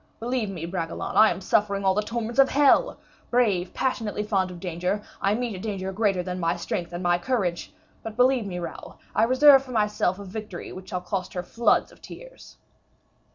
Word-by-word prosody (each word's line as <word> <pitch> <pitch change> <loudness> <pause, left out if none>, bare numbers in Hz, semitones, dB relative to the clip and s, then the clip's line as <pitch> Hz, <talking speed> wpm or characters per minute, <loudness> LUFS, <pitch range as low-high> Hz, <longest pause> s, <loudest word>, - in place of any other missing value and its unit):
Believe 235 -2 -2
me, 175 -4 -5
Bragelonne, 170 -2 -4
I 220 0 +7
am 180 +2 -3
suffering 200 0 +1
all 190 - +4
the 210 - +1
torments 230 +3 -4
of 270 - +6
hell; 290 - +4 0.3
brave, 205 -8 +1
passionately 225 -5 -2
fond 195 -3 0
of 180 -1 -9
danger, 180 +3 -2 0.2
I 200 +2 +2
meet 235 -3 -3
a - - -7
danger 190 -2 -4
greater 195 -2 0
than 180 0 -4
my 170 0 0
strength 170 0 -4
and 175 +1 -5
my 175 0 +2
courage. 185 -7 -2 0.3
But, 225 0 -8
believe 250 -3 +3
me, 180 -2 -5
Raoul, 170 -2 -7 0.2
I - - +2
reserve 270 +3 +7
for 270 - -14
myself 210 -4 +1
a 200 - -8
victory 200 -1 -7
which 185 0 -10
shall 180 - -3
cost 185 0 -4
her 180 - -2
floods 230 +6 +1
of - - -20
tears." - - -13
200 Hz, 200 wpm, -25 LUFS, 180-235 Hz, 0.3 s, I